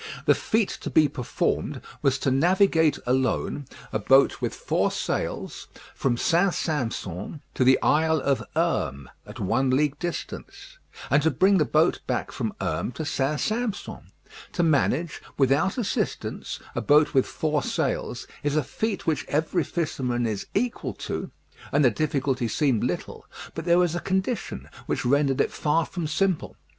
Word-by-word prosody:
The - - +6
feat 220 -2 0
to - - -4
be 155 -2 +5
performed 130 -3 -2 0.2
was 135 -1 +2
to 135 - +1
navigate 165 +2 +3
alone 130 +3 0 0.3
a 110 - +1
boat 135 +6 +4
with - - -2
four - - 0
sails - - -3 0.3
from 125 -3 0
St. 175 +6 +2
Sampson 120 - -3
to - - +1
the 130 +1 +5
Isle 160 +1 +3
of 140 -1 +1
Herm, 80 - -1 0.2
at - - -10
one 130 +7 +1
league 145 +2 +1
distance, 340 - -6 0.3
and 140 - +5
to 160 - +3
bring 190 +3 +4
the 155 - +3
boat 115 - +2
back - - -1
from - - -2
Herm - - -2
to 155 +4 -4
St. 145 0 0
Sampson. 220 -1 -3 0.4
To 175 - +1
manage, 155 +1 +1 0.2
without 140 - +2
assistance, 235 -5 -2
a - - -2
boat 150 +1 +4
with 130 - +3
four 155 -2 -1
sails, - - -2 0.2
is 145 0 0
a 155 - +2
feat 220 - -3
which 150 -5 0
every 160 +3 +1
fisherman 130 -7 -1
is 105 -3 -3
equal 200 - -1
to, - - -4 0.4
and 145 0 +4
the 125 - +5
difficulty 135 -2 0
seemed 125 0 +1
little; - - -4 0.3
but 160 - -5
there 170 0 +4
was 175 -2 +3
a 175 - -1
condition 190 +4 -2 0.2
which - - -1
rendered 140 +1 +2
it - - +2
far 160 +2 +1
from 175 -4 -4
simple. 185 +2 0
150 Hz, 160 wpm, -25 LUFS, 130-170 Hz, 0.4 s, The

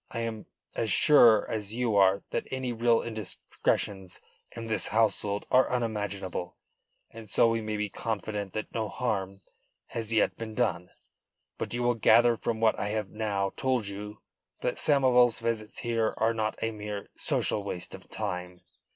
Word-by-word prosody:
I 115 - -4
am 115 -2 -5 0.3
as 110 -3 0
sure 115 -4 +6
as 105 0 -3
you 120 -3 0
are 100 0 +4
that - - -2
any 130 -2 -3
real 115 0 +2
indiscretions 100 -3 -3 0.4
in 115 -1 -6
this 110 -5 -1
household 105 -2 +1
are 130 0 +5
unimaginable, 105 -7 -3 0.5
and 115 -2 -11
so 115 - +4
we 115 0 0
may 110 -1 -3
be 105 0 -1
confident 105 -1 -4
that 110 - -5
no 110 -2 -2
harm 95 -3 -3 0.5
has 115 -1 -4
yet 110 - +2
been 110 -1 -6
done. 90 -8 0 0.7
But - - -2
you 120 - -1
will 120 0 +3
gather 115 +1 +5
from 115 0 -3
what 110 -1 +2
I - - -1
have 105 -1 -3
now 100 -3 -1
told 130 -4 0
you 105 +1 -7 0.4
that - - -1
Samoval's 125 -5 +4
visits 115 -2 -3
here 115 -2 0
are 115 +1 +2
not 110 -1 -2
a 115 - 0
mere 105 -1 -6
social 105 - 0
waste 90 -3 -5
of - - -11
time. 90 0 -5
110 Hz, 165 wpm, -28 LUFS, 100-115 Hz, 0.7 s, sure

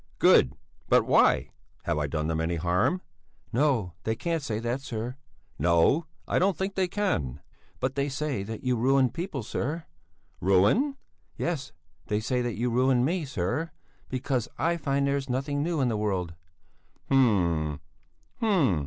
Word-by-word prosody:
"Good! 65 +1 +5 0.3
But - - +5
why? - - +4 0.3
Have 75 - 0
I 75 - 0
done 75 +1 -2
them 80 0 0
any 85 +1 0
harm?" 90 - +1 0.5
"No, 120 - +2
they 110 - 0
can't 165 +5 -1
say 115 -6 -2
that, 120 +4 -2
sir." 120 -1 -4 0.4
"No, 85 - +3 0.2
I - - +2
don't 190 0 +2
think 190 +1 -2
they 190 -1 +1
can." 80 - -1 0.4
"But 130 +1 -1
they 140 +1 -1
say 140 -5 -2
that 110 +2 -6
you 125 -1 +1
ruin 130 +1 +3
people, 165 - -4
sir." 150 +9 -3 0.6
"Ruin?" 100 - +3 0.4
"Yes, 155 -6 -2 0.4
they 105 - 0
say 125 +3 0
that 120 -3 -2
you 120 +2 0
ruined 125 +1 +3
me, 170 +2 0
sir, 130 - -2 0.4
because 130 -2 -1
I 165 +5 +1
find 140 -3 0
that 140 - +1
there's 140 -1 -2
nothing 140 +3 -1
new 165 -1 0
in 130 - +2
the 115 - 0
world." 95 -5 -1 0.8
"Hm! 85 - +2 0.6
Hm! 170 - +3
130 Hz, 160 wpm, -27 LUFS, 100-145 Hz, 0.8 s, Good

